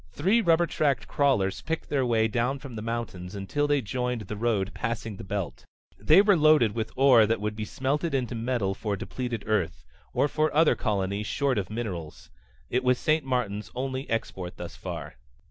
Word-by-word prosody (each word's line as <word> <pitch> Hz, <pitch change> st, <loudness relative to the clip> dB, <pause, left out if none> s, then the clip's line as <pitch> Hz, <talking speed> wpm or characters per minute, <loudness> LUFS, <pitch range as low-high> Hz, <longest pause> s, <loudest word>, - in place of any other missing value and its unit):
Three 195 Hz, +10 st, +2 dB
rubber 170 Hz, -3 st, +4 dB
tracked 140 Hz, -7 st, 0 dB
crawlers 125 Hz, -11 st, +1 dB
picked 165 Hz, 0 st, -4 dB
their 140 Hz, -2 st, +1 dB
way 110 Hz, -2 st, +3 dB
down 120 Hz, +4 st, 0 dB
from 135 Hz, -3 st, -9 dB
the 110 Hz, -, -5 dB
mountains 105 Hz, -5 st, -4 dB
until 125 Hz, +10 st, -1 dB
they 145 Hz, -2 st, +2 dB
joined 125 Hz, +1 st, -2 dB
the 105 Hz, +1 st, -6 dB
road 105 Hz, -3 st, 0 dB
passing 115 Hz, -3 st, -3 dB
the -, -, -8 dB
belt. 95 Hz, -9 st, -4 dB, 0.4 s
They 155 Hz, -, +6 dB
were 205 Hz, -2 st, +5 dB
loaded 155 Hz, -8 st, +5 dB
with 110 Hz, -1 st, -3 dB
ore 130 Hz, -5 st, +6 dB
that 115 Hz, 0 st, +1 dB
would 105 Hz, 0 st, -3 dB
be 110 Hz, 0 st, -4 dB
smelted 140 Hz, +6 st, -1 dB
into 125 Hz, -2 st, -1 dB
metal 115 Hz, -4 st, -1 dB
for 105 Hz, +1 st, -3 dB
depleted 120 Hz, +2 st, -4 dB
Earth, 85 Hz, -, -1 dB, 0.3 s
or -, -, +2 dB
for 155 Hz, +1 st, +1 dB
other 160 Hz, 0 st, +5 dB
colonies 100 Hz, -1 st, -1 dB
short 135 Hz, -5 st, +1 dB
of 95 Hz, -, -4 dB
minerals. 95 Hz, -9 st, -6 dB, 0.4 s
It 125 Hz, +1 st, 0 dB
was 125 Hz, 0 st, +3 dB
St. 155 Hz, +3 st, +1 dB
Martin's 120 Hz, -6 st, -2 dB
only 130 Hz, +1 st, -3 dB
export 95 Hz, -5 st, -3 dB
thus -, -, -7 dB
far. -, -, -7 dB
120 Hz, 185 wpm, -27 LUFS, 105-140 Hz, 0.4 s, They